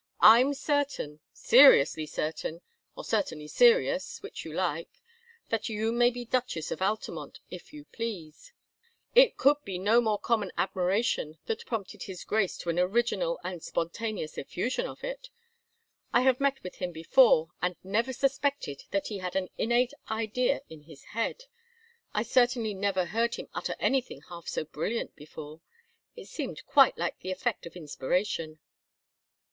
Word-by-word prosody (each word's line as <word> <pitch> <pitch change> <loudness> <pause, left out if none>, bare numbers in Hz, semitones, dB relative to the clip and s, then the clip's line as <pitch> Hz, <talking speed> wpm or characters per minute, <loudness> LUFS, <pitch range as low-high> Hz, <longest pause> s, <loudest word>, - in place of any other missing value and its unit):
I'm 250 +6 +7
certain, 285 - -1
seriously 485 - +6
certain, 160 +2 -4 0.4
or - - -6
certainly 170 -9 -1
serious, - - +3
which - - -7
you - - -8
like, - - -2 0.6
that 225 0 -1
you 220 +1 -1
may 240 +1 +4
be 245 0 -6
Duchess 240 -10 -2
of - - -4
Altamont, 210 +3 -3
if - - -10
you 300 -1 -11
please. 225 - -7 0.6
It - - +6
could 285 +2 +5
be 190 -2 -4
no 215 +6 +4 0.2
common 215 -3 0
admiration 185 -4 0
that 455 0 -4
prompted 215 -5 -4
his 185 -2 -7
Grace 210 -3 0
to 170 - -5
an 170 - -1
original 240 - +1
and 180 -3 -5
spontaneous 170 +1 -3
effusion 250 - -2
of - - -11
it. - - -6 0.8
I 240 - +4
have 255 -1 +3
met 275 -1 0
with 180 - -8
him 180 -1 -3
before, 165 0 +4
and 180 0 0
never 225 +7 0
suspected 275 - -1
that 195 - -1
he 205 -3 -4
had 180 -1 -5
an 190 -1 -1
innate 240 +3 +2 0.2
idea 225 +4 0
in 160 -2 -12
his 150 -2 -15
head. 230 - -2 0.7
I - - 0
certainly 240 -3 +2
never 190 -2 0
heard 230 +6 0
him - - -8
utter - - -3
anything 255 - 0
half 170 -1 -10
so - - -2
brilliant 165 +10 -3
before 150 +1 -10 0.5
it - - -10
seemed - - -6
quite 275 -3 +5
like 170 0 -2
the 185 - -7
effect 190 +2 -2
of 170 - -13
inspiration." 155 +1 -2
220 Hz, 150 wpm, -29 LUFS, 175-255 Hz, 0.8 s, I'm